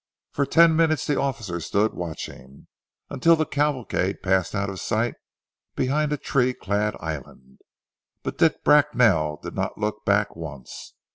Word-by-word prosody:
For 140 -1 -1
ten 165 -1 +5
minutes 160 -2 +2
the 145 - 0
officer 110 -10 -2
stood 105 +6 0
watching, 70 -6 -8 0.5
until 165 +5 +4
the 155 -1 0
cavalcade 135 -10 -1
passed 95 0 +1
out 100 0 -1
of 95 -2 -6
sight 115 +2 -1 0.6
behind 150 +3 0
a 150 - 0
tree 125 -2 0
clad 105 +2 -1
island, 70 -4 -8 0.6
but - - -5
Dick 160 -2 +2
Bracknell 120 - +4
did - - -6
not - - -3
look 105 0 -3
back 100 0 +1
once. 75 -6 -9
105 Hz, 145 wpm, -24 LUFS, 90-145 Hz, 0.6 s, ten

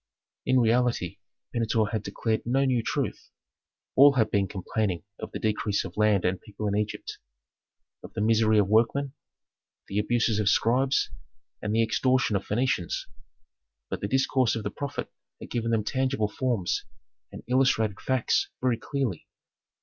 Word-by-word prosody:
In 130 0 +4
reality 120 -5 +1 0.3
Pentuer 110 -2 +1
had 110 - -1
declared 110 +1 -2
no 135 +3 +1
new 125 -3 +2
truth; - - -3 0.7
all 140 +1 +8
had 110 -5 +2
been 100 -2 +2
complaining 95 -1 -2 0.2
of - - -6
the - - -4
decrease 105 -1 0
of 90 - -8
land 105 -3 +3
and 90 +1 0
people 105 0 -5
in 100 - 0
Egypt, 105 0 -3 0.8
of - - -11
the - - -3
misery 110 0 +3
of 105 -2 +4
workmen, 120 +6 +2 0.7
the 100 - -1
abuses 110 0 +1
of 105 -2 +2
scribes, 130 +5 +2 0.5
and 105 +1 -1
the 115 - +4
extortion 125 0 +2
of 100 - 0
Phœnicians. 105 -6 0 0.9
But - - -3
the 100 - -1
discourse 130 -1 +2
of 115 - -4
the - - -3
prophet 140 -1 -5 0.3
had - - -10
given 115 -1 -1
them 115 -2 +1
tangible 130 -2 0
forms, 115 -8 -1 0.5
and - - -9
illustrated 120 -5 +2
facts 130 -3 +1
very 125 -2 +1
clearly. 130 - -3
115 Hz, 155 wpm, -27 LUFS, 105-125 Hz, 0.9 s, all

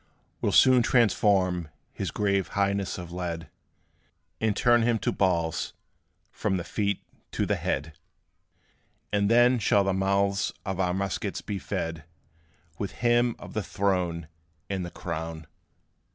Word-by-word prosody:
We - - +1
'll - - -1
soon 130 -1 +6
transform 95 - +2 0.2
his - - -3
grave 100 -2 0
highness 100 -1 0
of 85 -2 -7
lead, 85 -2 -4 0.9
And 110 -2 +1
turn 120 -1 +4
him 115 0 +2
to - - -1
balls 85 -4 0 0.6
from 95 -3 -1
the 85 - -3
feet 100 +1 -1 0.3
to - - 0
the - - +1
head; 75 +3 -2 1.2
And 100 0 +2
then 120 +2 +5
shall 100 -1 +3
the 95 -1 +1
mouths 100 +1 +1
of 95 -2 -3
our 90 -1 +1
muskets 95 0 -2
be 100 -2 -4
fed 80 -3 -4 0.7
With 100 - -3
him 120 0 +3
of - - -10
the 110 - -1
throne 90 -4 -1 0.4
and 95 -2 -1
the 85 - -5
crown. 80 -2 -5
95 Hz, 140 wpm, -27 LUFS, 90-105 Hz, 1.2 s, soon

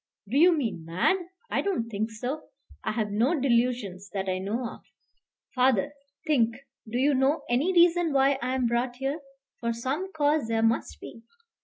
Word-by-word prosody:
"Do 230 - -4
you 335 +3 +6
mean 225 - -2
mad? 175 - +1 0.3
I - - +1
don't 360 -13 -1
think 220 0 -2
so. 250 +8 -5 0.4
I - - -1
have 215 -2 -1
no 250 +10 +2
delusions 235 -7 0
that 195 -1 -2
I 185 0 -1
know 220 +6 -2
of. - - -10 0.7
Father, 255 0 +2 0.3
think 235 -7 +2 0.3
do 235 - -2
you 280 +3 +3
know 275 +3 +2
any 265 +10 +2
reason 345 -2 +4
why 275 0 +3
I 255 +2 -1
am 255 -2 +1
brought 240 +1 0
here? 270 +5 -3 0.4
for 235 -1 -1
some 275 +11 -3
cause 295 -5 +1
there 225 0 0
must 225 0 0
be." 230 - -10
250 Hz, 175 wpm, -27 LUFS, 225-290 Hz, 0.7 s, you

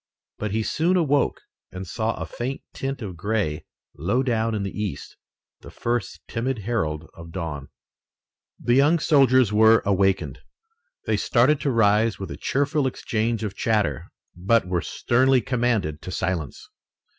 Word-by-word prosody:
But 105 - -2
he 110 +2 -1
soon 170 +10 +1
awoke 145 -4 +1 0.3
and 95 +1 -6
saw 110 +5 -2
a - - -5
faint 130 +3 -5
tint 135 -2 -4
of 95 -4 -6
gray 95 -4 -2 0.3
low 100 - 0
down 115 -3 0
in 100 - -2
the 100 - -3
east, 105 -9 -5 0.4
the - - -12
first 120 -4 -3
timid 125 +2 -2
herald 80 -9 -2
of 85 0 -11
dawn. 80 -6 -5 0.9
The 120 - +1
young 145 +6 +5
soldiers 130 - +4
were 110 +1 +6
awakened. 95 -1 +1 0.7
They - - +1
started 135 +5 +3
to 145 - 0
rise 110 -2 +3
with 95 - -6
a - - -5
cheerful 145 0 0
exchange 115 -2 -2
of 105 -3 -3
chatter, 105 - 0 0.2
but 95 +4 +2
were 90 -2 0
sternly 130 +7 +2
commanded 115 - -1
to - - -8
silence. 85 -6 -3
110 Hz, 150 wpm, -24 LUFS, 95-125 Hz, 0.9 s, were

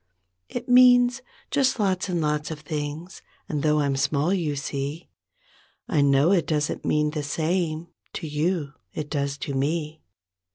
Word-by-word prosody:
It - - -5
means 245 0 +6 0.3
just 270 -3 +2
lots 190 -2 0
and 175 -2 0
lots 150 0 -1
of 155 -2 -6
things 150 +4 -5 0.3
And 150 -2 -2
though 150 0 +2
I'm 140 -1 +1
small, 145 +5 +1
you 160 -6 -1
see, 140 +3 -4 0.8
I 165 -10 +2
know 140 +4 +4
it 175 -6 +2
doesn't 150 -2 -1
mean 150 0 +1
the 150 -1 -3
same 160 +2 -1 0.3
To - - -5
you, 150 0 -1 0.2
it 150 -1 -5
does 140 -2 -1
to 145 -1 -4
me. 150 +3 -2
155 Hz, 155 wpm, -25 LUFS, 145-175 Hz, 0.8 s, means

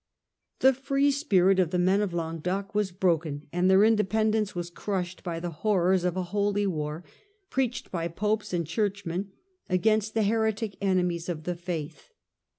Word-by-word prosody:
The 265 +1 +6
free 275 +2 +1
spirit 195 - +3
of 180 -4 +3
the 180 - -1
men 185 +3 +3
of 205 -3 -1
Languedoc 175 +5 -3
was 210 -2 0
broken 165 -6 0
and 180 +1 +2
their 190 +2 +6
independence 215 -1 +2
was 175 0 -4
crushed 185 -1 -3
by 170 -2 -3
the 175 0 -4
horrors 190 -3 +2
of 180 0 0
a 185 - 0
"holy 205 0 +1
war," 155 -2 -3 0.5
preached 255 -2 -1
by 170 -2 -2
Popes 210 +5 -1
and 170 -2 -1
Churchmen 195 +1 -2 0.4
against 215 +3 +1
the 220 - +3
heretic 220 -1 0
enemies 180 -3 0
of 160 -3 -4
the 180 - -2
faith. 170 - -6
190 Hz, 160 wpm, -27 LUFS, 175-210 Hz, 0.5 s, The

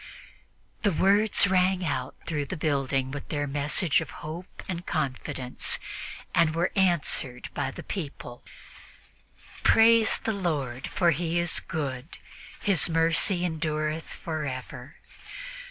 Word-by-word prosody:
The 205 - +2
words 200 +5 +4
rang 185 -1 +2
out 130 -4 -2
through 150 -4 -2
the 185 - -4
building 135 -3 0
with 145 0 -7
their 145 -1 -1
message 145 +3 +2
of - - -6 0.2
hope 165 +4 -8
and 175 -2 -4
confidence 130 -5 -1 0.6
and 165 -2 +3
were 170 +2 +1
answered 170 -9 +1
by 135 - -1
the - - -9
people: 140 -9 -6 1.2
"Praise 225 0 +5
the 225 - -2
Lord, 145 -10 -2
for 175 -2 +2
He 165 +2 -1
is 170 -1 +3
good: 145 -3 -5 0.4
for - - -17
His 185 -6 +4
mercy 165 +3 +2
endureth 155 -1 -2
forever. 140 -3 -6
160 Hz, 120 wpm, -27 LUFS, 140-180 Hz, 1.2 s, Praise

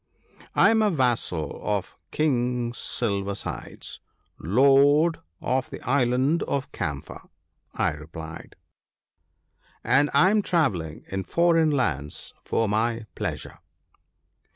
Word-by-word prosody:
" - - -22
I - - +6
am 220 -1 +3
a 215 - +3
vassal 120 - -1
of 100 -3 -2
King 125 -5 0
Silver 100 -5 -2
sides, - - -6 0.4
Lord 140 - +4 0.2
of 130 0 -1
the - - -7
Island 130 +4 +2
of 140 -1 -2
Camphor," 75 -7 -5 0.5
I - - +1
replied, 80 +2 -9 1.3
"and 145 +2 +3
I 150 +8 +5
am 215 0 +3
travelling 95 - -1
in 95 0 -3
foreign 170 -2 +3
lands 80 - -2
for 115 - 0
my 115 +2 0
pleasure." - - -5
125 Hz, 110 wpm, -25 LUFS, 100-145 Hz, 1.3 s, I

